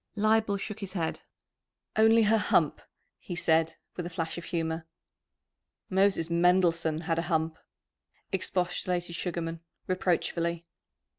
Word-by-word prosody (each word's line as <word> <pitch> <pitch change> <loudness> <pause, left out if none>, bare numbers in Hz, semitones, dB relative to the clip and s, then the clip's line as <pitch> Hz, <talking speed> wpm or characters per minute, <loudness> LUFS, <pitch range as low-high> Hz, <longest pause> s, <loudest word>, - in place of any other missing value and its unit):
Leibel 215 -1 +2
shook 210 +1 -5
his 195 -3 -6
head. 165 -4 -2 0.7
"Only 225 +1 +6
her 220 +1 +4
hump," - - +2 0.4
he 175 - -6
said, 160 -1 +2 0.2
with 175 - -3
a - - -6
flash 165 -1 -3
of 170 - -10
humour. 165 -1 -2 1.0
"Moses 190 -3 +3
Mendelssohn 170 -2 +3
had 165 0 0
a 170 +1 -3
hump," 160 -1 0 0.7
expostulated 180 -1 -1
Sugarman 165 -1 -3 0.3
reproachfully. 170 -2 0
175 Hz, 120 wpm, -29 LUFS, 165-190 Hz, 1.0 s, Only